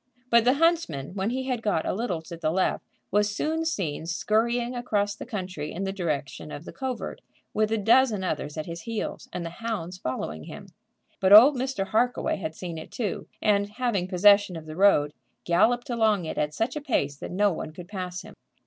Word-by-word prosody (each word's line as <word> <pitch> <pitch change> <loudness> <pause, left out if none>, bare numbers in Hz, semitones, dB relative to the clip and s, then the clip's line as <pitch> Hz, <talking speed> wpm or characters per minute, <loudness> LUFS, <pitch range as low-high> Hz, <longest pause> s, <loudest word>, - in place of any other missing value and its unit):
But 235 -1 +6
the 250 +2 +5
huntsman, 300 - +1
when 195 +1 -1
he 260 +2 -2
had 255 -3 -2
got 205 -8 0
a - - 0
little 185 -7 -2
to 170 - -8
the 165 -2 -1
left, 185 +3 0 0.3
was 210 +1 +3
soon 320 +7 -1
seen 170 - -2
scurrying 235 +7 0
across 205 -4 0
the - - -9
country 185 -9 -5
in 190 - -4
the 195 - -1
direction 155 -6 -3
of 145 - -8
the - - -9
covert, 260 -2 -4 0.3
with 215 0 +1
a 225 - +2
dozen 220 -1 +4
others 150 -3 -3
at 155 - -3
his 170 0 -6
heels, 230 -1 -5
and 175 - -4
the 165 - -5
hounds 185 -6 -4
following 80 - -4
him. - - -9 0.5
But 190 +1 +5
old 255 +8 +10
Mr. 255 -6 -2
Harkaway 245 +3 +1
had 160 -4 -5
seen 170 -2 -6
it 160 - -10
too, 215 -6 -3 0.2
and 200 -1 +3
having 210 -5 -1
possession 200 0 +5
of 160 -1 -7
the 155 0 -8
road, 160 -6 +4 0.3
galloped 230 +9 +2
along 220 -6 +2
it - - -4
at 150 0 -1
such 230 +3 -1
a 300 - -3
pace 145 - 0
that - - -7
no 200 +1 +2
one 155 - -5
could 175 +2 -10
pass 180 -2 -5
him. - - -12
200 Hz, 205 wpm, -26 LUFS, 170-235 Hz, 0.5 s, old